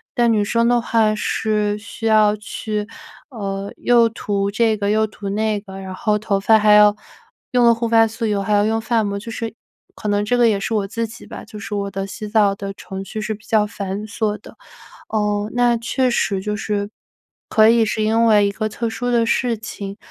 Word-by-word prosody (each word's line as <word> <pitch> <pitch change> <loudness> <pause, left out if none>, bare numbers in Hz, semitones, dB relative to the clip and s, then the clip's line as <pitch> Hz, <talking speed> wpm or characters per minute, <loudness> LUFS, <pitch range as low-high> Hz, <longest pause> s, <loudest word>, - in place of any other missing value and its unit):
但 240 -2 +3
女 210 -1 +2
生 230 +3 +1
的 240 0 +3
话 225 -2 +2
是 210 -1 -1
需 210 +2 -6
要 215 -1 +4
去 210 0 -4 0.4
呃， 200 -5 -5
又 235 -1 +4
涂 200 -3 -2
这 220 +1 +2
个， 200 -1 -2
又 215 +1 +2
涂 210 -2 -7
那 215 +1 0
个， 195 -2 -11
然 190 -1 -7
后 210 +2 0
头 205 -2 -1
发 220 +3 +5
还 210 -1 +4
要 210 0 +6 0.6
用 245 -1 +3
了 235 - +6
护 230 0 -2
发 225 0 +5
素 225 +1 -4
以 215 - +1
后 200 - -1
还 210 +2 -1
要 205 0 +3
用 225 +1 0
发 225 0 +1
膜， 200 -1 -3
就 230 +3 -8
是 225 0 -5 0.4
可 - - -7
能 205 0 +1
这 245 +4 +1
个 240 -1 +4
也 205 -2 +1
是 210 - -3
我 205 -3 0
自 230 +3 -3
己 225 +2 -11
吧， - - -9
就 215 -1 -10
是 205 - -5
我 200 -1 -3
的 195 0 -4
洗 215 +2 -7
澡 205 -2 +3
的 195 0 -6
程 195 0 -8
序 215 +3 -5
是 215 0 -3
比 215 - -19
较 215 -2 +2
繁 205 -1 -5
琐 215 -1 -2
的。 - - -14 0.5
哦， 210 -1 -1
那 240 -1 +3
确 250 +3 0
实， 200 -5 0
就 210 +1 -2
是 205 -1 -3 0.6
可 220 0 +5
以 230 0 +4
是 215 +1 -1
因 225 +2 +2
为 210 -2 +5
一 - - 0
个 215 +1 -2
特 230 +1 -3
殊 245 +2 -3
的 235 -1 +3
事 235 0 0
情， 200 -2 -7
215 Hz, 240 characters per minute, -20 LUFS, 205-225 Hz, 0.6 s, 要